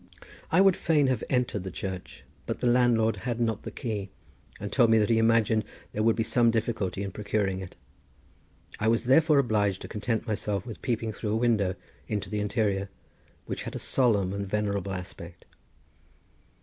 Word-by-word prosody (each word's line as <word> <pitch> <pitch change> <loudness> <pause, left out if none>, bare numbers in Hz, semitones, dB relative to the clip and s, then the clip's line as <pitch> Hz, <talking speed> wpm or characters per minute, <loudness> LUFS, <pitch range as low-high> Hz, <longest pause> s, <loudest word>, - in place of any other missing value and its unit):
I 180 - +5
would 195 -2 +5
fain 150 -3 +2
have 130 - 0
entered 125 -6 0
the 95 - -4
church, 95 +1 -6 0.2
but - - -3
the - - -2
landlord 120 -2 +3
had 120 -2 -3
not 115 -3 0
the - - -6
key, 105 -6 -4 0.5
and 100 - -5
told 120 -4 +4
me 110 - +5
that 110 +1 +2
he 115 - +4
imagined 115 -1 +3 0.3
there 105 - -2
would 115 +1 +3
be 115 - 0
some 120 +1 +3
difficulty 110 -4 -1
in 100 - -4
procuring 100 -1 -1
it. 95 -1 -8 1.0
I 105 - 0
was 115 +1 +3
therefore 150 +4 +5
obliged 105 -7 +2
to - - -6
content 110 +2 -2
myself 105 -3 -2
with 115 - -8
peeping 115 -3 -1
through 105 0 -3
a - - +2
window 110 -6 +2 0.3
into 105 0 -3
the 105 - -1
interior, 100 -2 0 0.6
which - - -4
had - - -6
a - - -1
solemn 105 -8 +1
and 100 0 -3
venerable 100 -1 -1
aspect. 90 -1 -8
110 Hz, 180 wpm, -28 LUFS, 100-120 Hz, 1.0 s, I